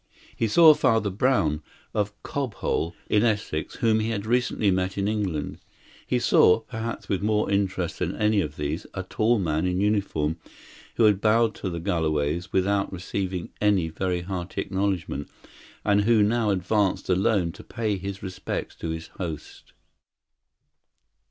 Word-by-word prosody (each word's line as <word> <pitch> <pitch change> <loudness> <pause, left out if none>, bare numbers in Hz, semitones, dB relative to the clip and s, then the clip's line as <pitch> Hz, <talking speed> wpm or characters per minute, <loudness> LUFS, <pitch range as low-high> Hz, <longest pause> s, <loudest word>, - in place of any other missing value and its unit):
He 115 - 0
saw 155 +8 +8
Father 110 -7 +2
Brown, 95 - +1 0.3
of 105 -1 0
Cobhole, 105 - -2
in 105 - +3
Essex, 105 -8 -1
whom 110 -1 +2
he 110 +1 -1
had 105 -2 -2
recently 120 -3 +1
met 95 +1 -1
in 100 0 0
England. 95 -9 -2 0.5
He - - +1
saw 90 +5 +5
perhaps 115 0 -5
with 95 - -1
more 105 0 +1
interest 95 -3 -1
than 90 +1 -1
any 105 -1 +2
of 75 -4 -4
these 75 +5 -3
a 95 - -3
tall 110 +5 +1
man 80 -2 0
in 90 0 0
uniform, 95 -7 0 0.6
who 115 - +2
had 105 -2 +4
bowed 110 +1 +3
to 95 - -4
the 85 -1 -4
Galloways 80 -2 -1
without 100 +1 +1
receiving 95 -1 -4
any 100 -6 +2
very 90 +2 -2
hearty 90 0 -4
acknowledgment, 95 -7 -2 0.6
and 100 0 +4
who 110 0 +4
now 110 +1 +2
advanced 100 +1 +1
alone 95 -2 +2
to - - -13
pay 110 -3 -2
his 95 +1 -6
respects 95 -2 -4
to 85 - -4
his 80 0 -5
host. 80 -5 -7
100 Hz, 150 wpm, -25 LUFS, 90-110 Hz, 0.6 s, saw